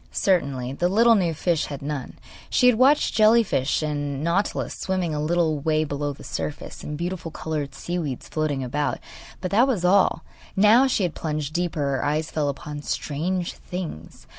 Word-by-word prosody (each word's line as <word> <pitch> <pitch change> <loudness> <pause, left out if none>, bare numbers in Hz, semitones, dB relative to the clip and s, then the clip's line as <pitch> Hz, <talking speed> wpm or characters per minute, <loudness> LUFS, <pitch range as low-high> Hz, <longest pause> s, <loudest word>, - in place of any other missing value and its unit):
Certainly 140 -9 0
the 175 +5 0
little 230 +4 +5
new 185 -6 +2
fish 170 0 0
had 140 -2 -7
none. 145 -2 -5 0.3
She 250 - +3
had 250 -2 +6
watched 280 +3 +4
jelly 220 +2 +5
fish 150 -6 0
and 145 -2 -2
nautilus 175 +5 0
swimming 185 -4 -2
a 150 - -2
little 160 -1 +1
way 155 +1 +1
below 145 -1 -2
the 140 - -11
surface, 145 - -5
and 150 - -5
beautiful 175 0 -4
coloured 155 -3 -4
sea 175 +1 -3
weeds 140 -7 -4
floating 150 -4 -1
about; 145 +4 -1 0.4
but 185 - -3
that 235 +6 +5
was 210 -10 0
all. 185 -3 +3 0.3
Now, 210 +4 +6
when 270 0 +4
she 200 -7 +2
plunged 155 -2 -4
deeper 170 -3 -1
her 140 -2 0
eyes 150 +2 -1
fell 150 -2 0
upon 145 +1 -6
strange 170 +5 -2
things. 165 - -7
160 Hz, 180 wpm, -24 LUFS, 145-185 Hz, 0.4 s, had